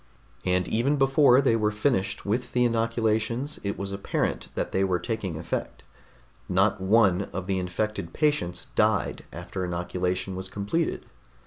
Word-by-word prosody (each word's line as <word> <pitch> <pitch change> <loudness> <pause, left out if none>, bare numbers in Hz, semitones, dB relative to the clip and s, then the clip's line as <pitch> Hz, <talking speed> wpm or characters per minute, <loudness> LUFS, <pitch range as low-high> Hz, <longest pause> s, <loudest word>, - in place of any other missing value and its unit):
And 90 0 +1
even 125 +6 +1
before 135 -1 +5
they 130 -4 +3
were 105 -2 +2
finished 105 -3 0
with 115 +5 -1
the 125 0 +3
inoculations, 115 +3 0
it 100 0 -2
was 100 0 -4
apparent 100 0 -2
that - - -2
they 95 - +1
were 95 -2 +2
taking 95 -3 -3
effect. 80 - -4 0.7
Not 95 +2 +2
one 100 -1 +3
of 95 0 -4
the 95 -1 0
infected 90 -1 -2
patients 145 - 0
died 105 -3 +1
after 95 - -5
inoculation 90 +1 -2
was 95 0 -5
completed. 105 - -2
100 Hz, 145 wpm, -26 LUFS, 95-115 Hz, 0.7 s, before